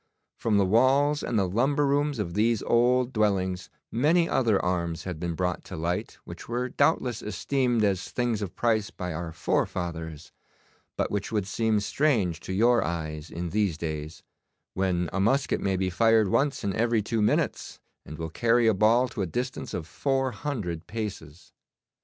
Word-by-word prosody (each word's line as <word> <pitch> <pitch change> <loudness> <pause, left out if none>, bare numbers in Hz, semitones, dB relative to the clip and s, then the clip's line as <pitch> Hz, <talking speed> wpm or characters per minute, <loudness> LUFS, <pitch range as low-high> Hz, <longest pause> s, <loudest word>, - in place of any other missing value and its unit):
From 110 -3 +2
the 100 - +4
walls 135 +8 +3
and 115 - -1
the 95 -2 +2
lumber 135 +9 +1
rooms 145 0 +1
of 90 -6 -3
these 110 +2 +1
old 125 +2 +2
dwellings 95 -4 0 0.2
many 160 +8 +3
other 115 -10 +2
arms 85 -2 -2
had 90 -4 -5
been 85 -1 -3
brought 90 +1 -2
to - - -7
light 85 +3 -3
which - - -10
were 125 +2 -1
doubtless 125 -4 +1
esteemed 120 +1 0
as 95 -3 0
things 120 -3 -1
of 95 -3 -5
price 110 -3 +1
by 90 -2 -5
our 80 +1 -5
forefathers, 80 -2 -3 0.7
but - - -1
which 100 - -2
would 105 -4 0
seem 110 +1 +1
strange 105 - +1
to 95 - -7
your 115 +5 +3
eyes 80 -1 -4
in 85 0 -5
these 100 -6 0
days, 80 -1 -5 0.5
when 90 -2 0
a 95 - -1
musket 130 +8 +1
may 95 -1 0
be 95 0 -1
fired 115 +1 +4
once 135 +5 +1
in 100 - -1
every 115 -1 +1
two 110 +1 -1
minutes, 105 - 0 0.2
and 75 - -9
will 80 0 -4
carry 120 +5 +2
a 110 - +5
ball 110 +5 +4
to 110 - -5
a 95 - -1
distance 125 +8 -4
of 85 - -4
four 135 - -1
hundred 105 - -4
paces. 100 -8 -7
105 Hz, 175 wpm, -27 LUFS, 90-120 Hz, 0.7 s, a